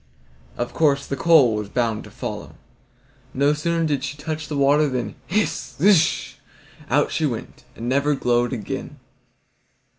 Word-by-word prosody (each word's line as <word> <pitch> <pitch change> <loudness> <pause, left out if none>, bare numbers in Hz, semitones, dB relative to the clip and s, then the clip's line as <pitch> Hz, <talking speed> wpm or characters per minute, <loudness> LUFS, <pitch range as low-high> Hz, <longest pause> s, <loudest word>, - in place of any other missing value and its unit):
Of 120 - -3
course, 140 -3 +2
the 140 - -3
coal 145 -6 +5
was 105 -1 -3
bound 115 -3 -1
to - - -11
follow. - - -7 0.8
No 140 +2 +3
sooner 165 +2 0
did 145 -4 -1
she 145 +1 -4
touch 155 +1 -5
the 145 - -3
water 145 +2 +4
than 120 -5 -3
hiss, 210 +4 -1
zish! 175 -2 +3 0.5
out - - +2
she - - +1
went, - - -7
and 115 - -6
never 140 +3 +2
glowed 120 -2 +1
again. 115 -6 -5
140 Hz, 150 wpm, -22 LUFS, 125-155 Hz, 0.8 s, coal